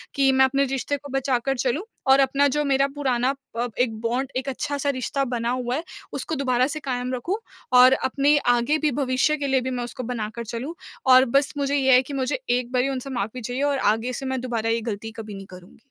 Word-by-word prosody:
कि 275 -1 +4
मैं 265 0 +5
अपने 275 +1 +1
रिश्ते 270 +2 -2
को 285 0 -12
बचाकर 270 -1 0
चलूँ 255 +7 0 0.3
और 270 - +7
अपना 275 +1 +3
जो 295 +2 0
मेरा 275 0 +3
पुराना 260 -2 +1 0.3
अ, 240 - 0
एक 225 -3 0
बॉन्ड, 250 +4 -1
एक 260 +1 -2
अच्छा-सा 285 +1 -2
रिश्ता 275 +1 -1
बना 235 0 -1
हुआ 250 0 -1
है 310 - -3 0.3
उसको 320 - -3
दोबारा 255 -2 +1
से 300 +2 -3
कायम 255 -3 -3
रखूँ 345 - -2 0.4
और 255 +1 +8
अपने 280 +3 +2 0.2
आगे 240 +6 +1
भी 305 -1 +1
भविष्य 265 +3 +2
के 285 -1 -2
लिए 265 -1 +2
भी 255 - -3
मैं 250 -1 -3
उसको 245 +2 -6
बना 225 -3 -3
कर 235 - -4
चलूँ। 240 +8 -5 0.4
और 255 +1 +8
बस 280 0 +1
मुझे 280 0 0
ये 265 -2 +4
है 250 - +7
कि 265 +2 -9
मुझे 265 - -1
एक 245 0 0
बारी 255 +1 +1
उनसे 270 0 -4
माफ़ी 245 0 -3
चाहिए 245 +4 -3
और 285 -1 +1 0.2
आगे 230 +3 -3
से 270 - -5
मैं 260 -1 -2
दोबारा 230 -3 -2
ये 230 0 +1
गलती 225 0 -5
कभी 215 -2 -7
नहीं 195 0 -8
करूँगी। 180 -1 -14
260 Hz, 230 wpm, -24 LUFS, 245-275 Hz, 0.4 s, और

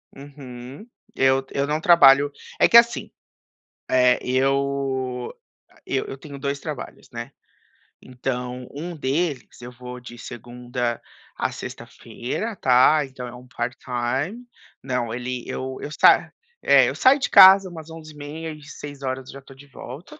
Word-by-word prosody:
Uhum. 135 - -11 0.3
Eu 135 0 +2
eu 140 +1 -1
não 150 +1 0
trabalho 145 -4 +6 0.3
é - - +6
que, 235 - +7
assim, 235 0 +3 0.8
eh, 125 -1 +4
eu 135 -1 -1 0.5
e - - -1
eu 135 - -3
tenho 140 -1 -10
2 140 0 -3
trabalhos, 150 -4 -8
né. 120 +2 -7 0.7
Então, 125 0 -5
1 170 +5 -6
deles 145 -1 -2
eu 120 +1 -9
vou 125 0 -9
de 120 -1 -12
segunda 120 0 -5 0.4
a - - -1
sexta-feira 210 - -6
tá, 130 +1 +4
então, 130 -2 -9
é 120 - -9
um 125 +1 -14
part 125 0 -4
time 130 - -3 0.4
não, 125 -3 -2
ele 125 0 -4
eu 130 0 -5
eu - - -5
sa - - +4 0.3
é, - - +5
eu - - -5
saio 270 +2 +5
de 275 - -1
casa 190 0 +8
umas 160 -2 -10
11:30 155 0 -8
e 150 -1 -12
18:00 135 -3 -7
eu - - -10
já 140 - -9
estou 135 0 -16
de 140 +2 -16
volta. 150 - -11
135 Hz, 150 wpm, -23 LUFS, 125-150 Hz, 0.8 s, casa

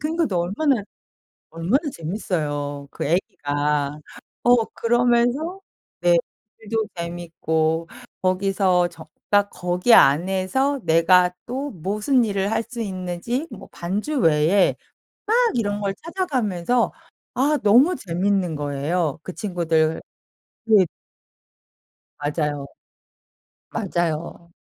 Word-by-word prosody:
그러니까 320 +2 0
또 180 -3 -1
얼마나, 220 - +1 0.7
얼마나 170 - +1
재밌어요 150 -5 -3
그 - - -4
애기가. 145 -3 -1 0.4
어 245 0 +6 0.2
그러면서 245 +9 +1 0.4
네 175 -1 +5 0.4
글도 220 0 -2
재밌고 165 -1 -2 0.3
거기서 185 -1 +2
적 160 -2 -14 0.2
딱 205 0 +3
거기 180 +6 +1
안에서 190 - +3
내가 180 +2 +5
또 270 +4 -4
무슨 210 - +1
일을 200 -2 -1
할 225 - 0
수 240 0 -9
있는지 190 - -3
뭐 - - -10
반주 210 - -2
외에 165 +2 +4 0.5
막 440 - +1 0.2
이런 205 -3 0
걸 195 -1 -1
찾아가면서 250 - 0 0.4
아 285 +4 +2
너무 250 - +5
재밌는 185 - -1
거예요. 145 +2 -1
그 185 - -7
친구들 165 -5 0 0.7
네. 210 -5 +5 1.3
맞아요. 145 -1 -2 1.1
맞아요. 170 -4 -3
185 Hz, 210 characters per minute, -22 LUFS, 165-230 Hz, 1.3 s, 어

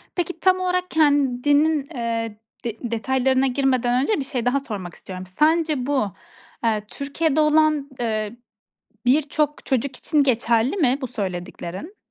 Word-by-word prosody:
Peki, 350 -1 -2
tam 370 +1 +3
olarak 365 0 -1
kendinin, 290 0 +3
eee, 230 -2 -2 0.3
de 230 -1 -3
detaylarına 265 +3 +1
girmeden 255 -2 +1
önce 415 0 +1
bir - - -1
şey 250 -4 -3
daha 265 +3 +2
sormak 200 - -6
istiyorum. 185 -1 -8
Sence 305 - +1
bu, 265 -9 0 0.5
eee, 220 -2 +1
Türkiye'de 290 +3 -1
olan, 305 -1 +3
eee, 215 -1 -2 0.7
birçok 295 +2 +1
çocuk 265 0 0
için 295 -3 +2
geçerli 235 - +2
mi, 270 -5 +3
bu 260 - -2
söylediklerin? 190 - -5
270 Hz, 135 wpm, -23 LUFS, 230-300 Hz, 0.7 s, tam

